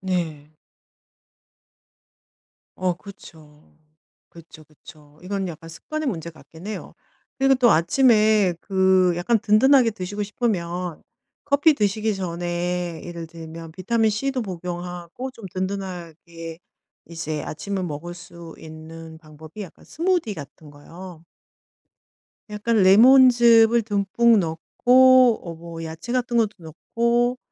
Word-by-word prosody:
네. 160 -5 -4 2.2
어 185 -1 -1
그쵸. 155 -6 -15 0.6
그쵸, 165 -2 -15
그쵸. 150 -1 -18
이건 195 +1 -3
약간 165 -1 -9
습관의 305 - -5
문제 170 -7 -4
같기는 165 +3 -13
해요. - - -8 0.4
그리고 270 0 +4
또 250 -3 +4
아침에 215 +1 +3
그 190 -2 +2
약간 205 +7 +1
든든하게 235 +4 +4
드시고 205 +1 -5
싶으면 180 -6 -3 0.4
커피 290 +2 +3
드시기 210 -2 -1
전에 175 -1 -3
예를 170 -1 -8
들면 165 0 -10
비타민 220 +4 +1
C도 255 +4 -2
복용하고 180 +4 -6
좀 230 -4 -15
든든하게 170 -4 -6 0.5
이제 155 -2 -5
아침을 190 +4 -4
먹을 165 +2 -6
수 170 -2 -12
있는 160 0 -11
방법이 155 +4 -13
약간 180 - -13
스무디 335 - -1
같은 145 0 -12
거요. 165 +3 -12 1.3
약간 220 +2 -1
레몬즙을 235 +2 +6
듬뿍 210 +2 +2
넣고 165 -3 -3 0.8
어 170 -2 -7
뭐 165 0 -9
야채 160 +9 -7
같은 245 -1 -1
것도 225 -3 +3
넣고 235 +9 -1
180 Hz, 240 characters per minute, -22 LUFS, 165-220 Hz, 2.2 s, 레몬즙을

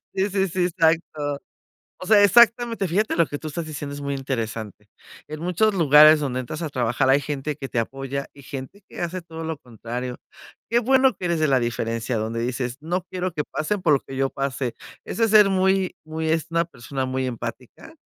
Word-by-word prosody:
Sí, 195 +2 +1
sí, 195 0 +1
sí, 180 +1 0
exacto. 160 -4 0 0.6
O 185 - -7
sea, 210 0 +6
exactamente. 230 -1 +4
Fíjate 205 +6 0
lo 170 - +4
que 145 -1 -6
tú 155 - -7
estás 160 +2 -4
diciendo 145 -2 -6
es 145 - -7
muy 140 0 -2
interesante. 115 -6 -4 0.4
En 155 0 -7
muchos 180 +6 +1
lugares 155 -2 +7
donde 130 -3 -2
entras 140 +6 -6
a 160 - -2
trabajar 130 0 0
hay 140 +2 +5
gente 145 +1 -3
que 135 -2 -6
te 120 - -1
apoya 135 +3 -4
y 140 - -14
gente 135 +11 -8
que - - -8
hace 175 0 -3
todo 165 -1 -8
lo 160 -2 -3
contrario. 125 0 -6 0.5
Qué 235 - +2
bueno 260 +1 +4
que 180 - -5
eres 170 -2 0
de 155 - +3
la 135 -2 +3
diferencia, 115 0 -2
donde 110 +2 -2
dices: 125 0 -3
"No 175 +4 -1
quiero 185 0 -3
que 150 - -1
pasen 185 +6 -2
por 150 - +4
lo 135 - +4
que 135 - -9
yo 135 0 +1
pasé". 130 -3 -3 0.3
Eso 225 - -2
es 225 - +2
ser 210 -2 +7
muy 190 0 +1
muy 160 0 -3
es 160 0 +1
una 170 0 +2
persona 135 -4 -5
muy 130 0 -1
empática 125 -3 -7
150 Hz, 210 wpm, -23 LUFS, 130-180 Hz, 0.6 s, lugares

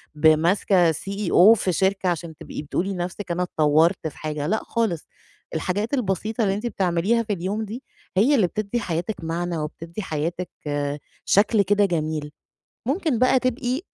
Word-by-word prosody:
ب 150 +1 +4
ماسكة 170 +2 +4
CEO 195 +3 +4
في 190 -4 -1
شركة 190 +1 +1
عشان 170 -2 -3
تبقي - - -7
بتقولي 180 +6 -2
لنَفْسِك 180 +1 -4
أنا 180 +1 0
اتطوّرت 160 0 +2
في 150 - -9
حاجة، 150 -1 -3
لأ 215 +5 +1
خالص، 220 -9 -1 0.5
الحاجات 205 - -1
البسيطة 220 -1 0
اللي 195 - +2
أنتِ 215 +4 -3
بتعمليها 195 +2 +1
في 210 -2 -2
اليوم 200 +4 -2
دي 230 +6 -7 0.3
هي 250 +9 +5
اللي 210 -9 +4
بتدّي 215 +5 -2
حياتِك 175 -1 -3
معنى 170 +1 -2
وبتدّي 165 +4 -5
حياتِك 170 +1 -3 0.8
شكل 210 +1 +4
كده 205 +1 +3
جميل. 155 -4 -2 0.6
ممكن 290 - 0
بقى 255 +1 +4
تبقي 255 +2 -1
190 Hz, 155 wpm, -23 LUFS, 165-215 Hz, 0.8 s, هي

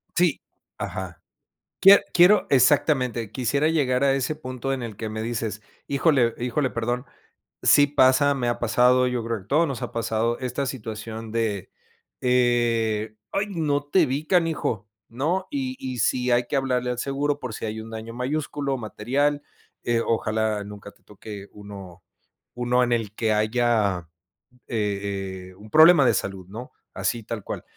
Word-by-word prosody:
Sí. 175 -5 +2 0.4
Ajá. 95 -3 -6 0.6
Quie 195 +1 +8
quiero 180 +4 +6
exactamente, 130 -4 +2
quisiera 140 +4 0
llegar 135 -5 +1
a 135 -1 +4
ese 135 +3 -1
punto 130 -2 -4
en 130 -2 -4
el 110 -3 -7
que 110 - -4
me 110 0 -4
dices: 110 -2 -3 0.3
"Híjole, 135 -4 +2
híjole, 125 +3 -1
perdón". 120 +3 -2 0.6
Sí 145 - +6
pasa, 140 0 +4
me 125 -3 -2
ha 120 - -1
pasado, 125 +2 +3
yo 125 -2 -2
creo 115 -1 -2
que 95 - -15
a - - -27
todos 160 +6 +3
nos 135 -4 -5
ha - - -5
pasado 115 0 -1
esta 130 +2 -2
situación 110 -3 -6
de, 110 -5 -2 0.5
eh, 115 -3 +1 0.2
"ay, 205 +1 0
no 150 -5 -1
te 160 +3 +3
vi 140 +3 -3
canijo", 160 - 0 0.2
¿no? 165 +11 -1
Y 265 -2 -3
y 130 -2 -5
sí 125 +3 +1
hay 120 0 +3
que - - -2
hablarle 125 -2 0
al 125 - -4
seguro 140 +2 -1
por 125 -5 -6
si 115 - -5
hay 110 0 -4
un 110 - -10
daño 110 +1 -7
mayúsculo, 140 +2 -2
material. 135 +6 -1 0.4
Eh, 120 -1 +1
ojalá 110 -2 0
nunca 100 0 -10
te - - -31
toque 105 -1 -10
uno, 100 -4 -11 0.5
uno 125 +1 +2
en 120 -1 +1
el 110 -3 -2
que 110 0 0
haya, 110 -5 +1 0.6
eh 100 -3 -3
eh, 95 - -18
un 105 +2 -14
problema 155 0 +7
de - - +4
salud, 95 -2 -4
¿no? 115 +5 -8 0.2
Así 95 +5 -1
tal 105 -2 -6
cual. - - -6
120 Hz, 165 wpm, -24 LUFS, 110-140 Hz, 0.6 s, Quie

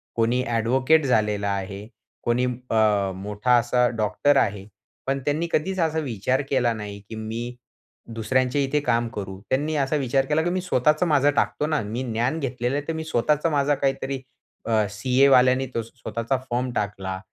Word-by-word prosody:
कोणी 120 +2 +2
ॲडव्होकेट 130 +6 +2
झालेला 105 -5 +1
आहे, 100 +1 -5 0.4
कोणी 120 +1 +1
अ, 110 -5 +1
मोठा 105 +5 +1
असा 120 +1 +2
डॉक्टर 110 +7 +2
आहे, 100 -5 0 0.4
पण 135 0 0
त्यांनी 155 +4 0
कधीच 190 +5 0
असा 160 -1 +1
विचार 130 -1 -1
केला 125 -3 +2
नाही, 105 -2 -7
की 110 - -6
मी 115 +3 -5 0.6
दुसऱ्यांच्या 130 +4 +1
इथे 140 +2 +1
काम 120 -4 +1
करू. 95 -2 -5
त्यांनी 150 +4 0
असा 140 +1 +1
विचार 135 -1 +1
केला, 150 +2 +1
की 175 - 0
मी 185 +1 -1
स्वतःचं 155 -1 +2
माझं 145 -2 +4
टाकतो 150 - 0
ना. 155 -1 0
मी 115 +4 -4
ज्ञान 125 +8 0
घेतलेलंय, 130 0 -2
तर 165 - -1
मी 160 0 -4
स्वतःचा 150 +2 +1
माझा 145 -1 +2
काहीतरी 135 -1 -2 0.4
अ, 110 -2 +2
सीएवाल्याने 130 +3 +4
तो 115 - +1
स्वतःचा 115 +2 -3
फर्म 125 +1 -1
टाकला, 95 -2 -3
125 Hz, 165 wpm, -24 LUFS, 110-140 Hz, 0.6 s, माझं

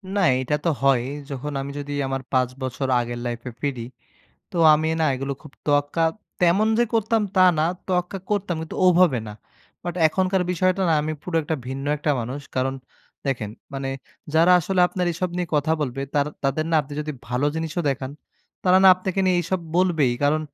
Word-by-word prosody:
না, - - +2 0.2
এইটা 130 +3 0
তো - - +4
হয় 135 -3 +4 0.3
যখন 145 +2 -4
আমি 140 +1 -5
যদি 145 0 -6 0.2
আমার 135 0 -2
৫ 130 -2 +2
বছর 130 +1 -2
আগের 120 0 -3
লাইফ 120 -1 -3
এ - - -8
ফিরি, 140 -4 -2 0.7
তো - - -7 0.2
আমি 155 +1 0
না - - +3
এগুলো 135 +2 -3
খুব 150 -3 -13
তোয়াক্কা 145 +2 +1 0.4
তেমন 180 +5 +4
যে 240 - +5
করতাম 225 0 +2
তা 185 - +3 0.2
না, - - +3 0.2
তোয়াক্কা 180 +1 -1
করতাম 200 -4 0
কিন্তু 160 - -7
ওভাবে 175 -7 +5
না। - - -6 0.5
বাট 175 -1 -3
এখনকার 185 +3 +1
বিষয়টা 185 +2 +1
না - - +4
আমি 155 +1 -2
পুরো 180 -2 -3
একটা 155 +2 -2
ভিন্ন 135 +1 -5
একটা 150 +1 -1
মানুষ। 130 +5 -5 0.2
কারণ 130 +1 0 0.5
দেখেন, 115 -6 -2 0.2
মানে 135 0 -3 0.5
যারা 165 +3 +6
আসলে 185 +3 0
আপনার 180 -1 -2
এসব 175 +2 -2
নিয়ে 180 -1 -2
কথা 150 +2 +2
বলবে 135 -2 -2
তার 145 -1 +2 0.2
তাদের 135 +3 +1
না - - +1
আপনি 145 +1 -13
যদি 150 0 -4
ভালো 125 +3 0
জিনিসও 160 +1 -2
দেখান, 135 0 -4 0.5
তারা 185 0 +5
না - - +10
আপনাকে 185 +1 -2
নিয়ে 185 -1 +3
এসব 180 +3 -2 0.2
বলবেই 165 -8 +3
কারণ 150 +2 +3
155 Hz, 190 wpm, -23 LUFS, 135-180 Hz, 0.7 s, না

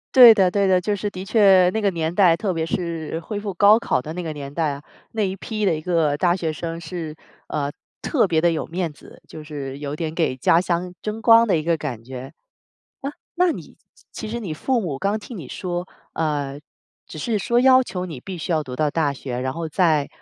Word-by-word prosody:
对 245 -3 +11
的， 190 -4 +3
对 200 0 +2
的。 185 -1 +4
就 210 +3 -1
是 205 +1 -3
的 185 -2 -7
确 195 -3 +5
那 220 - 0
个 200 - +3
年 165 -2 -2
代， 180 -3 +5
特 190 +2 -2
别 165 -1 -1
是 165 -2 -3
恢 205 +4 -5
复 205 -2 -4
高 205 +5 +6
考 180 - 0
的 150 - -7
那 180 - -4
个 160 -3 -4
年 140 -1 -8
代 160 -1 0
啊， 140 +1 -7 0.3
那 220 - -1
一 190 -2 0
批 215 +2 -3
的 185 - +3
一 155 - -5
个 160 -4 +1
大 175 +1 +2
学 165 -4 -2
生 165 +2 -5
是 160 -2 -6 0.3
呃， 145 -2 -2 0.3
特 250 -8 +2
别 160 -3 +2
地 170 0 +3
有 160 - -2
面 170 -1 -3
子。 145 - -16
就 155 - -9
是 140 -3 -6
有 145 0 -4
点 160 -1 -3
给 160 -6 0
家 150 +6 +4
乡 180 0 -2
争 215 +1 -4
光 230 0 +6
的 200 - +3
一 155 - -2
个 165 0 +1
感 130 -7 -5
觉。 130 +3 -8 0.7
啊， 275 +1 -3 0.2
那 360 -1 +3
你 - - -10 0.4
其 220 - -6
实 235 +2 -4
你 180 -8 -4
父 250 - 0
母 150 -9 -3
刚 200 +5 0
听 230 +3 -10
你 165 -9 -7
说， 175 +2 -4 0.3
呃， 145 -3 -2 0.5
只 155 - -9
是 220 +6 -1
说 235 +4 +2
要 260 0 +6
求 185 -7 -4
你 155 -6 -7
必 185 +7 -7
须 160 - -5
要 160 -2 +2
读 130 -3 -7
到 150 +3 +1
大 150 -2 +1
学， 130 -2 -5
然 130 +1 -2
后 165 +1 -4
再 155 -3 +2
170 Hz, 250 characters per minute, -22 LUFS, 155-200 Hz, 0.7 s, 对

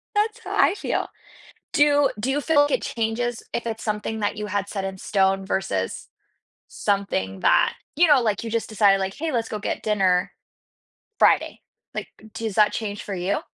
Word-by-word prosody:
That's 425 +1 +1
how - - -4
I - - +4
feel. - - -2 0.7
Do 290 -1 +4
do 235 +6 -1
you 285 +2 +1
feel 295 -1 +4
like 290 - +1
it - - +1
changes 230 +1 -2
if 235 - -3
it's 225 0 -4
something 215 0 -2
that 205 0 -1
you 210 0 -4
had 205 0 -2
set 195 -2 -4
in 190 0 -5
stone 195 0 +1
versus 100 - -2 0.6
something 95 - -1
that, - - +4 0.2
you 350 - +6
know, 290 -3 +6
like, 215 -4 0
you 230 - -5
just 230 0 -1
decided, 200 -2 +4
like, 190 0 -2
"Hey, 320 +2 -3
let's 230 -3 -1
go 215 - -4
get - - -3
dinner 190 -4 +2 0.9
Friday." - - +3 0.3
Like, - - -4 0.3
does 220 -3 -4
that 210 -1 +5
change 205 -2 -4
for 200 - -5
you? 185 +3 -1
210 Hz, 185 wpm, -24 LUFS, 195-240 Hz, 0.9 s, you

